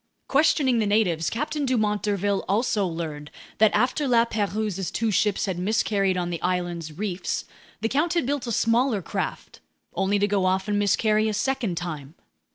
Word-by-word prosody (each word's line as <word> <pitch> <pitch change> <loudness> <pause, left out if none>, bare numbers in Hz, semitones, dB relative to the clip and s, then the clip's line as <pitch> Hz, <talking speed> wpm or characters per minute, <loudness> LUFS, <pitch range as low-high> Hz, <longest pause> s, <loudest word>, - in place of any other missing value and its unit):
Questioning 275 -3 +3
the 215 - +1
natives, 180 -7 +1
Captain 295 +4 -2
Dumont 215 -6 +1
d'Urville 200 -1 0
also 205 -1 +1
learned 155 -3 -5 0.3
that 220 0 +6
after 250 +7 +1
La 235 -2 +4
Pérouse's 205 -4 -2
two 225 -1 -1
ships 210 0 +1
had 185 -3 -3
miscarried 195 -1 +1
on 175 -1 -2
the 170 - -4
island's 175 -3 -2
reefs, 195 -2 -3 0.4
the 225 - +1
count 310 +8 0
had 340 - +1
built 280 -1 -2
a - - -2
smaller 230 -1 +2
craft, - - -5 0.3
only 195 +3 +1
to 205 0 +2
go 200 -2 +1
off 190 +1 +1
and 205 -1 +1
miscarry 215 +2 +2
a 215 - -2
second 230 -6 -1
time. 155 -4 -5
205 Hz, 170 wpm, -25 LUFS, 185-230 Hz, 0.4 s, that